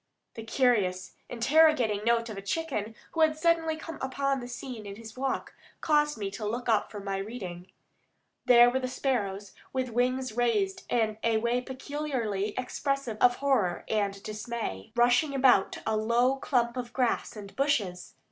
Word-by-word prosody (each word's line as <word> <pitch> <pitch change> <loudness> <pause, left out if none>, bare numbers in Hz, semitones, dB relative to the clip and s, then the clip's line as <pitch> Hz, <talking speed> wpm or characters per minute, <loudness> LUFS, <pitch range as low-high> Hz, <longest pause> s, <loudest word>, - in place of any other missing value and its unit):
The 225 - -7
curious, 220 -7 +1 0.2
interrogating 245 -4 +3
note 230 0 +2
of 215 - -6
a 195 - -6
chicken 225 -2 -3 0.2
who 325 - -1
had 310 -1 +4
suddenly 325 -1 +2
come 325 0 -8
upon 275 +1 -1
the 245 - -7
scene 245 -3 -7
in 200 - -7
his 220 0 -11
walk 265 +1 -2 0.3
caused 295 -2 +2
me 200 -2 -3
to 215 - -7
look 235 +4 -3
up 220 -3 +2
from 205 -2 -8
my 195 -1 -1
reading. 190 -4 -7 0.7
There 245 -1 +7
were 260 - 0
the 255 - -2
sparrows, 205 -7 -2 0.2
with 260 -1 -1
wings 255 +1 0
raised 375 - 0
in 220 -2 +1
a 230 -1 +3
way 235 +2 0
peculiarly 255 -7 -3
expressive 255 -2 -2
of 245 0 +6
horror 245 -12 0
and 200 -2 -1
dismay, 215 - -5
rushing 245 +5 +3
about 255 -7 +4
a 220 - +1
low 235 +5 +2
clump 240 -2 0
of 245 -1 -5
grass 250 -3 0
and 200 -2 -10
bushes. 215 -11 -1
240 Hz, 165 wpm, -28 LUFS, 215-270 Hz, 0.7 s, There